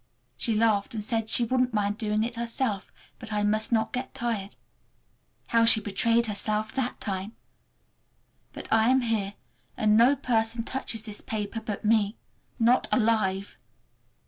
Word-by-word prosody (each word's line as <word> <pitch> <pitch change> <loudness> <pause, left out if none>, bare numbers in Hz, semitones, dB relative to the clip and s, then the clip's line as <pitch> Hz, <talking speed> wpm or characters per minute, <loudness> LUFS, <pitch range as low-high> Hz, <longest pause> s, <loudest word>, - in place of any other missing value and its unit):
She 225 - 0
laughed 215 -1 +1
and 215 - -3
said 225 -1 -2
she 240 - +4
wouldn't 250 0 0
mind 205 0 0
doing 215 -1 0
it 235 +1 -3
herself, 230 -3 -2 0.3
but 220 - -9
I 210 0 0
must 215 +2 0
not 220 -1 +1
get 255 +1 -4
tired. 220 -4 -3 0.9
How 230 0 +4
she 230 -1 +7
betrayed 230 +3 +1
herself 215 +1 -1
that 260 -2 -2
time! 195 +1 -4 1.2
But - - -9
I 225 +1 +4
am 260 0 +4
here, 215 -4 -1 0.4
and 215 -1 +3
no 240 +5 +5
person 230 -3 0
touches 230 -3 -3
this 210 -2 -6
paper 215 0 -4
but 210 0 -5
me—not 225 +3 0
alive! 215 -5 +1
220 Hz, 145 wpm, -27 LUFS, 210-235 Hz, 1.2 s, she